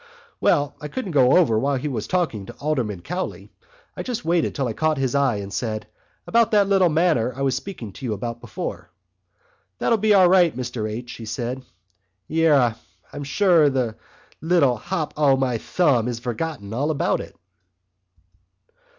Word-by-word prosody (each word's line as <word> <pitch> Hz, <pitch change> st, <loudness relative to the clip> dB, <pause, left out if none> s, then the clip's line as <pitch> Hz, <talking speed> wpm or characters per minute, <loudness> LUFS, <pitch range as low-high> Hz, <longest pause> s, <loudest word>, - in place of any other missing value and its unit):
"Well, 145 Hz, -4 st, +2 dB
I 150 Hz, -, -4 dB
couldn't 200 Hz, -, -5 dB
go 130 Hz, -2 st, +5 dB
over 115 Hz, -12 st, +3 dB
while 140 Hz, +3 st, 0 dB
he 135 Hz, +3 st, -3 dB
was 130 Hz, -5 st, -3 dB
talking 160 Hz, -, -1 dB
to -, -, -8 dB
Alderman 120 Hz, -, -2 dB
Cowley. 180 Hz, +2 st, -5 dB, 0.4 s
I -, -, -4 dB
just 245 Hz, -9 st, -4 dB
waited 170 Hz, 0 st, +1 dB
till 135 Hz, -3 st, -1 dB
I 115 Hz, -, -3 dB
caught 155 Hz, +4 st, 0 dB
his 130 Hz, -2 st, -1 dB
eye, 140 Hz, -4 st, +2 dB
and 100 Hz, -1 st, -6 dB
said: 110 Hz, 0 st, -3 dB, 0.4 s
'About 230 Hz, -1 st, +3 dB
that 205 Hz, -2 st, +3 dB
little 190 Hz, -3 st, +4 dB
matter 155 Hz, -7 st, +2 dB
I 135 Hz, -, -3 dB
was 135 Hz, -2 st, +1 dB
speaking 130 Hz, -, -7 dB
to 135 Hz, -, -8 dB
you 115 Hz, -, -1 dB
about....' 115 Hz, +3 st, -5 dB, 1.4 s
'That'll 230 Hz, -2 st, +1 dB
be 215 Hz, 0 st, +4 dB
all 185 Hz, -2 st, +7 dB
right, 175 Hz, -6 st, +4 dB
Mr 120 Hz, -4 st, -3 dB
H.,' 120 Hz, +2 st, -7 dB
he 115 Hz, -, -8 dB
said. 120 Hz, +3 st, -4 dB, 0.7 s
Yerra, 145 Hz, -8 st, +3 dB, 0.4 s
sure 165 Hz, +1 st, +3 dB
the 125 Hz, -5 st, -1 dB, 0.5 s
little 160 Hz, -7 st, +3 dB
hop 160 Hz, -, -3 dB
o' 140 Hz, -3 st, +4 dB
my 125 Hz, -3 st, 0 dB
thumb 130 Hz, -9 st, +1 dB
has 120 Hz, -2 st, -2 dB
forgotten 120 Hz, -2 st, -4 dB
all 140 Hz, +6 st, 0 dB
about 155 Hz, -, 0 dB
it." -, -, -11 dB
140 Hz, 170 wpm, -23 LUFS, 120-170 Hz, 1.4 s, all